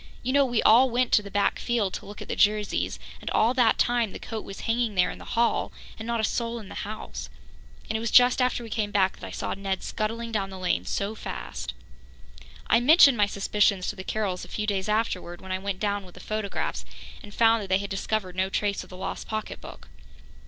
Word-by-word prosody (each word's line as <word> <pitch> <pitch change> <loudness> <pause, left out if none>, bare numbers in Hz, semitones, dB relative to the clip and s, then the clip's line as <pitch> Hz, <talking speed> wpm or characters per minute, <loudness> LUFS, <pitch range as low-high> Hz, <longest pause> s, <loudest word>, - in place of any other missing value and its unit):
You 255 +2 -1
know, 280 0 +5
we 240 -3 0
all 250 +4 +7
went 245 +1 +1
to - - +5
the 200 - -9
back 200 0 +1
field 230 -6 0
to - - -6
look 205 - -8
at - - -15
the - - -2
Jerseys, 210 0 +1 0.2
and - - -4
all 230 +3 +3
that 245 -3 +4
time 240 -4 +1
the - - -5
coat 220 -2 -5
was 195 - -8
hanging 230 -2 0
there 180 -1 +3
in - - -10
the - - -7
hall, 235 0 +2 0.3
and 220 - -6
not 235 -1 0
a - - 0
soul 235 +1 -1
in 210 -4 -9
the - - -8 0.2
house. 215 +1 -7 0.6
And - - -3
it - - +1
was 230 0 -2
just 250 +2 +6
after 250 -1 +1
we 225 - -9
came 210 -2 -1
back 195 -2 +2
that - - -7
I - - -8
saw - - -3
Ned 195 -1 -3
scuttling 230 +1 -3
down 200 -3 -1
the 190 - -8
lane 185 -1 0
so 200 +2 -2
fast." 210 - -6 0.9
I 230 - +4
mentioned 280 +1 +7
my 205 -1 +4
suspicions 200 -1 +1
to - - -4
the 190 - -7
Carrolls 195 -3 -2
a - - -8
few 210 - -3
days 200 -1 -1
afterwards, 195 -5 -1
when 190 - -9
I 185 - -1
went 195 -1 -3
down 205 -1 -1
with 180 -2 -15
the - - -11
photographs, 215 +1 -3 0.4
and 205 - -11
found 225 +1 +4
that 200 - -6
they 190 - +4
had 200 +1 -5
discovered 195 -1 -2
no 190 +1 0
trace 200 0 -1
of - - -16
the 185 - -10
lost - - -5
pocketbook. 215 0 -6
210 Hz, 235 wpm, -26 LUFS, 195-230 Hz, 0.9 s, all